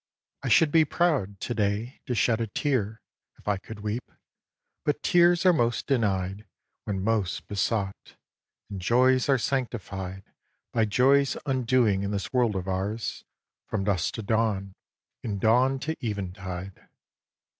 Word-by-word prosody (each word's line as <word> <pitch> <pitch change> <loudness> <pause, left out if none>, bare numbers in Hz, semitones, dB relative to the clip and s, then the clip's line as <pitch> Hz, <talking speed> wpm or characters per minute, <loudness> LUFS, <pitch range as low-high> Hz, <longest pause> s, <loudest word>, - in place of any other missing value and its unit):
I - - -4
should 160 -3 +5
be 160 0 +6
proud, 145 - 0
to 120 - -2
day, 105 +3 -1
to 125 - -1
shed 115 +2 +2
a 115 - -1
tear 110 -2 -1 0.4
If - - -22
I 105 -1 +2
could 105 +2 -10
weep. 105 +4 -4 0.7
But 150 0 -1
tears 175 0 +4
are 180 - +7
most 120 -6 +1
denied 100 -5 0 0.4
When 95 -2 -2
most 105 -4 -1
besought; 100 -1 -2 0.6
and 95 -2 -5
joys 130 +6 +3
are 135 - +5
sanctified 100 -7 -3 0.5
By 115 - +3
joys' 135 +6 +3
undoing 125 -6 +2
in 100 - -2
this 100 +5 -3
world 120 -5 +2
of 95 0 -3
ours 100 +4 -3 0.4
From 95 - -2
dusk 100 +3 0
to 115 - -5
dawn 100 -3 0 0.5
and 105 -4 -3
dawn 125 +6 +3
to 160 +2 -2
eventide. 95 -3 -5
110 Hz, 145 wpm, -27 LUFS, 100-130 Hz, 0.7 s, are